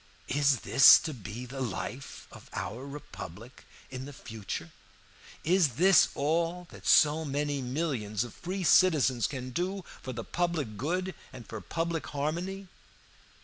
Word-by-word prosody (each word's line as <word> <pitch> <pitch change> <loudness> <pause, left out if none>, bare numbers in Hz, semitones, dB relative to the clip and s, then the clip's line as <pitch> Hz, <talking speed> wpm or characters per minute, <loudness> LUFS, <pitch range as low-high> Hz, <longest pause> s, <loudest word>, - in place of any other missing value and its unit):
Is 140 -2 +2
this 135 - +8
to 155 - -4
be 115 +1 -7
the 135 +2 -7
life 125 +4 -5
of - - -14
our 125 +6 -5
Republic 125 - -10 0.3
in 130 +2 -6
future? 110 - -7 0.7
Is 165 -7 +3
this 185 +4 +6
all 170 +4 0
that - - -10
so 155 +1 +5
many 145 -1 -2
millions 125 - -2
of 120 - -9
free 185 +2 -4
citizens 150 -9 +4
can 130 -2 -6
do 185 +5 -2 0.2
for 130 - -5
the 115 -2 -5
public 170 -10 -2
good 180 - -2 0.2
and 125 -3 -10
for 110 -2 -7
public 165 -1 -3
harmony? 175 +7 -3
145 Hz, 140 wpm, -29 LUFS, 125-170 Hz, 0.7 s, this